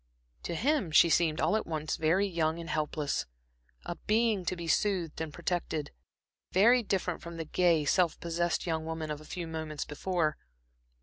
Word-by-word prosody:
To 170 - -4
him 260 - +1
she 165 +2 +6
seemed 160 -2 +2
all - - +2
at 220 - -1
once 155 -2 -2
very 165 +6 +2
young 165 -4 0
and 170 -1 -6
helpless, 150 -2 -1 0.6
a 175 - -4
being 215 -3 +2
to 185 - -1
be 170 -1 -6
soothed 175 -4 0
and 160 -2 -3
protected; 170 -2 -2 0.6
very 235 +7 +5
different 190 -5 -1
from 170 0 -8
the 165 - -4
gay, 165 -2 +2
self 175 +2 +2
possessed 170 0 -1
young 160 -2 -1
woman 160 -1 -4
of 150 0 -5
a - - -13
few 175 +1 -5
minutes 160 -2 -4
before. 155 0 -1
170 Hz, 175 wpm, -30 LUFS, 155-185 Hz, 0.6 s, she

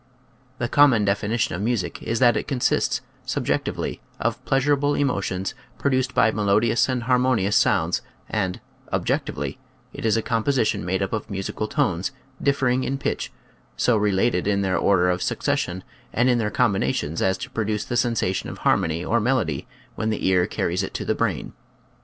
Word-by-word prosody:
The 120 - -1
common 130 -6 +5
definition 105 0 0
of 90 - -3
music 105 -6 -1
is 115 - -2
that 120 -2 +5
it - - -2
consists, 130 -4 +1 0.2
subjectively, - - -2 0.2
of 115 +2 -1
pleasurable 145 +1 +2
emotions 95 -8 -1 0.2
produced 130 -2 0
by 110 - +4
melodious 105 +4 +2
and 125 -2 -1
harmonious 125 -5 +2
sounds - - +2 0.3
and, 95 -1 -1 0.3
objectively, - - -2 0.3
it - - -8
is 110 0 +3
a 115 - -1
composition 115 - +1
made 95 +2 0
up 95 - -3
of 110 0 -3
musical 100 +2 -3
tones, 110 - 0 0.3
differing 130 -2 +2
in 135 - -1
pitch, - - -3 0.5
so 115 - +3
related 100 -1 +1
in 100 -1 +2
their 95 -1 +1
order 90 -3 +3
of 90 +1 -2
succession 90 +1 -1 0.3
and 125 +2 +2
in 120 - +2
their 110 -2 0
com 115 0 +2
binations 75 -2 -1
as 95 0 +2
to - - -7
produce 105 -2 -1
the 120 - -3
sensation 115 -6 0
of - - -7
har - - +3
mony 80 +2 -2
or 120 - +2
melody 105 - 0 0.3
when 110 - -2
the 110 - -2
ear 90 -1 +3
carries 90 +2 -1
it 95 - -5
to - - -3
the - - +1
brain. - - -2
110 Hz, 170 wpm, -23 LUFS, 95-125 Hz, 0.5 s, common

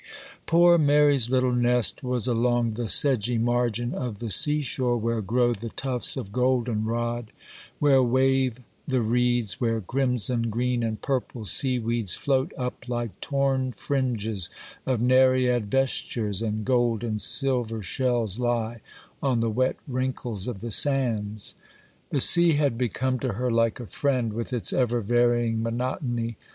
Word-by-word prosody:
Poor 170 +1 +5
Mary's 145 -4 +3
little 130 -1 +1
nest 125 -1 +2
was 125 -2 -1
along 120 -1 +1
the 115 +1 -4
sedgy 125 -2 +3
margin 120 0 0
of 120 -5 -4
the 115 0 -5
sea 150 +8 +3
shore, 125 -3 -1
where 115 0 -1
grow 120 +4 +1
the 115 +1 -6
tufts 125 0 -3
of 100 - -6
golden 125 -2 0
rod, 120 0 -3 0.5
where 140 -2 +4
wave 130 0 +1 0.3
the 130 -2 +1
reeds, 120 -2 +1
where 115 -2 +1
crimson, 125 +1 0
green, 120 +2 -1
and 110 -2 -3
purple 125 -4 -3
sea 130 +5 0
weeds 115 -4 0
float 135 +1 0
up, 125 -1 -5
like 120 -3 -4
torn 135 -2 0
fringes 115 -8 -2 0.4
of 130 -3 +1
Nereid 125 -3 +3
vestures, 115 -5 -1
and 110 -1 -3
gold 120 -3 +1
and 110 -2 -2
silver 120 -2 +1
shells 120 0 -1
lie 120 -2 -2 0.4
on 130 -4 +1
the 115 -1 0
wet 130 +4 0
wrinkles 125 -5 -3
of 115 -6 -5
the 120 0 -5
sands. 110 -6 0 0.6
The 140 - 0
sea 170 +4 +6
had 145 -4 +1
become 130 +2 -1
to 125 -3 -2
her 125 +4 -2
like 115 0 +1
a 120 - -6
friend, 125 -2 -1
with 115 +4 -4
its 120 -3 -2
ever 120 -2 +1
varying 120 0 +1
monotony. 120 -1 -3
120 Hz, 150 wpm, -25 LUFS, 115-130 Hz, 0.6 s, sea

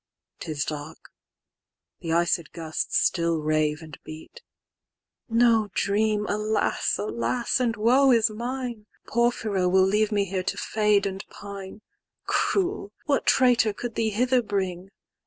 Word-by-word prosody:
'Tis 155 -4 -3
dark: 150 +1 -7 0.9
the 165 - -4
iced 170 -1 +1
gusts 160 -1 -2
still 170 -1 +1
rave 155 0 0
and 155 -3 -11
beat:"No 225 - -3
dream, 210 +1 +1
alas! 215 +1 0
alas! 235 +4 -1
and 240 -3 0
woe 255 +6 +4
is 230 -3 +4
mine!"Porphyro 235 -4 -2
will 190 +1 +4
leave 210 +2 +1
me 205 -1 +1
here 190 0 -2
to 185 - -3
fade 210 -2 +1
and 195 0 -4
pine.—"Cruel! 205 - -4
what 285 -2 0
traitor 245 -4 +4
could 240 +3 -6
thee 225 0 0
hither 250 +4 +2
bring? 190 -4 -3
210 Hz, 120 wpm, -25 LUFS, 180-235 Hz, 0.9 s, woe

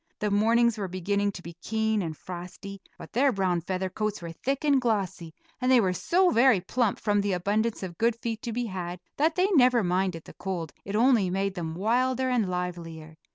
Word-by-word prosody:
The 210 -1 -1
mornings 230 +2 +3
were 195 - -2
beginning 200 +3 -1
to 175 - -9
be 170 - -8
keen 220 +1 0
and 160 -4 -4
frosty, 185 +2 -8 0.2
but - - -12
their 265 +4 +3
brown 185 -5 0
feather 185 +2 -2
coats 210 +2 -3
were 170 -1 -7
thick 270 - -3
and 280 -3 +4
glossy, 195 -8 -1 0.3
and 255 +1 +2
they 255 - +7
were 190 -5 +2
so 355 - +2
very 240 -2 +5
plump 220 +3 -1
from 205 -1 +1
the 200 -1 0
abundance 205 +5 0
of 175 -3 -7
good 230 0 +2
feed 230 -1 -4
to 235 - -4
be 240 +2 -2
had, 180 -4 -5 0.2
that 315 +3 +2
they 370 +2 +2
never 250 - +5
minded 180 -2 0
the - - -13
cold; 175 -5 -5
it 200 - -4
only 230 -4 +4
made 195 +1 -1
them 165 -3 -5
wilder 255 +6 +1
and 225 -6 +1
livelier. 170 -3 -5
200 Hz, 205 wpm, -27 LUFS, 180-235 Hz, 0.3 s, they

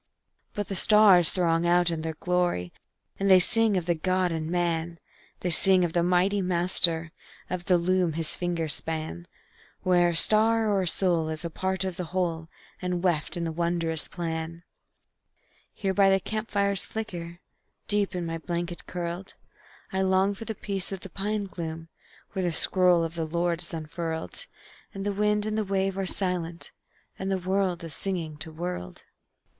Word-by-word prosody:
But 205 -1 -3
the - - -5
stars 195 -3 +6
throng 170 -2 +1
out 175 0 +3
in 165 -1 -3
their 160 0 -4
glory, 175 - -1 0.5
And 195 0 +1
they 190 -1 +8
sing 225 +1 +3
of 175 - -2
the 175 - +1
God 185 +2 0
in 160 -1 -3
man; 170 -1 -1 0.4
They 180 - -1
sing 185 +1 +8
of 165 - -4
the 175 - +2
Mighty 180 +3 +2
Master, 170 -2 +3 0.4
Of 180 -1 -4
the 180 - +3
loom 180 -1 +1
his 160 0 -3
fingers 170 -3 -1
span, 155 - -4 0.6
Where 175 -1 +3
a 170 - -3
star 220 +5 +5
or 195 -1 +1
a 185 - -2
soul 170 -2 +1
is 155 +1 -5
a 170 - -4
part 190 +3 -2
of 185 -2 -4
the 180 - -4
whole, 165 -2 -3 0.3
And 180 -1 -3
weft 170 -3 -1
in 170 - -3
the 165 - -2
wondrous 170 -1 -1
plan. 165 -1 -5 1.1
Here 195 -2 -3
by 195 0 +4
the 195 0 +3
camp 215 +3 -5
fire's 200 -1 +4
flicker, 175 -6 -6 0.5
Deep 205 -2 0
in 175 -1 -3
my 165 0 -4
blanket 175 +1 -5
curled, 175 +1 -6 0.6
I 190 - 0
long 190 +1 +2
for 215 +3 -9
the 220 - -5
peace 195 -2 -4
of 190 -2 -6
the 195 - -10
pine 205 +2 -2
gloom, 165 -3 -7 0.4
When 190 - -3
the 175 - 0
scroll 180 -1 +4
of 165 0 -4
the 165 -1 -3
Lord 170 +1 -1
is 170 - -11
unfurled, 165 - -6 0.5
And 195 0 -5
the 205 - -1
wind 210 +1 +1
and 215 0 -2
the 215 - 0
wave 195 -1 -1
are 195 -1 -3
silent, 175 -3 -2 0.5
And 190 -1 -3
world 185 -2 0
is 165 -3 -7
singing 165 -5 -4
to 160 +1 -5
world. 160 - -6
175 Hz, 180 wpm, -26 LUFS, 165-195 Hz, 1.1 s, they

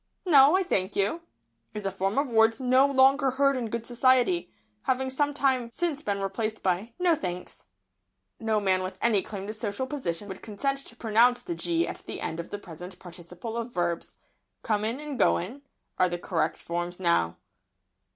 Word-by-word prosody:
"No, 295 -1 +7
I 385 - +1
thank 195 - 0
you," 205 +12 0 0.5
is 210 -1 -5
a 195 - 0
form 195 +3 -1
of 280 +1 +2
words 225 0 +3
no 260 +1 +4
longer 270 0 +4
heard 275 +1 +2
in 240 -3 -3
good 230 +1 -4
society, 240 -8 +2 0.3
having 260 0 0
some 290 +2 +1
time 265 -4 +1
since 310 +2 -2
been 200 -6 -2
replaced 215 +3 -3
by 190 +5 0
"No, 360 -1 +3
thanks." 180 - -5 0.7
No 220 -1 +1
man 190 -2 +2
with 185 +1 -5
any 220 -4 +3
claim 195 -1 -7
to 215 - -5
social 215 +3 -3
position 210 - -3
would 190 - -8
consent 275 +6 -2
to 235 - -11
pronounce 235 +2 +3
the 350 - -3
"g" 335 0 0
at - - -5
the - - -5
end 160 - -3
of 170 - -6
the 205 - -4
present 180 -1 -10
participle 180 +5 -8
of 235 +1 -4
verbs. 175 -1 -2 0.5
"Comin' 220 +3 -1
and 295 -4 -6
goin'" 215 +9 +1 0.4
are 185 0 +4
the 175 - -2
correct 175 -1 -1
forms 175 +1 -4
just - - -24
now. 130 - +2
225 Hz, 185 wpm, -27 LUFS, 185-265 Hz, 0.7 s, No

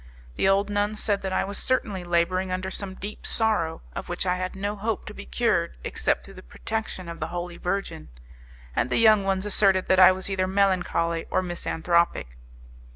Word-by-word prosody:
The 190 - +2
old 200 +1 +2
nuns 205 +1 0
said 205 -2 0
that 190 - -3
I - - +1
was 200 +1 -5
certainly 205 -7 -1
labouring 175 +2 +1
under 185 +1 -2
some 190 -1 -5
deep 205 +3 -8
sorrow, 210 - 0
of - - -6
which - - -2
I 180 0 +1
had 185 +1 -4
no 205 +2 -2
hope 215 +1 -2
to - - -8
be 65 - -10
cured 60 0 0
except - - -1
through - - -12
the - - -11
protection 190 - -5
of 170 0 -7
the 155 - -2
Holy 175 0 -5
Virgin, 180 - -3 0.7
and 125 - +1
the - - +1
young 215 -3 +6
ones 195 0 0
asserted 195 -2 +3
that 190 - +5
I 185 0 +9
was 185 0 -4
either 190 -1 0
melancholy 180 -4 +1
or 185 - +1
misanthropic. 170 - 0
190 Hz, 195 wpm, -25 LUFS, 175-200 Hz, 0.7 s, I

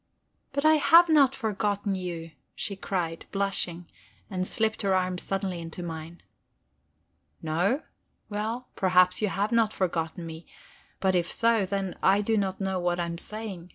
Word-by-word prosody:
"But 280 +2 -1
I 310 0 +7
have 335 +3 +7
not 280 -4 +5
forgotten 205 -2 -1
you," 175 -3 -5 0.2
she 200 - -3
cried, 175 -4 -3
blushing, 190 -3 -1 0.5
and 185 -1 -1
slipped 220 0 0
her 195 -2 +2
arm 185 -1 0
suddenly 190 -2 -2
into 165 +2 -7
mine. 165 0 -7 1.2
"No? 180 - +1 0.4
Well, 220 +4 -3
perhaps 180 0 +4
you 215 - +2
have 200 +3 -1
not 230 -2 +3
forgotten 170 -2 -2
me. 160 0 -9 0.5
But 190 -1 +2
if 175 -1 +1
so, 230 -4 +2
then 195 -1 -3
I 195 +2 +4
do 220 +2 +1
not 190 -2 -1
know 190 -1 -1
what 175 0 0
I 175 - 0
am 170 0 -5
saying. 205 -5 -7
190 Hz, 155 wpm, -27 LUFS, 175-215 Hz, 1.2 s, I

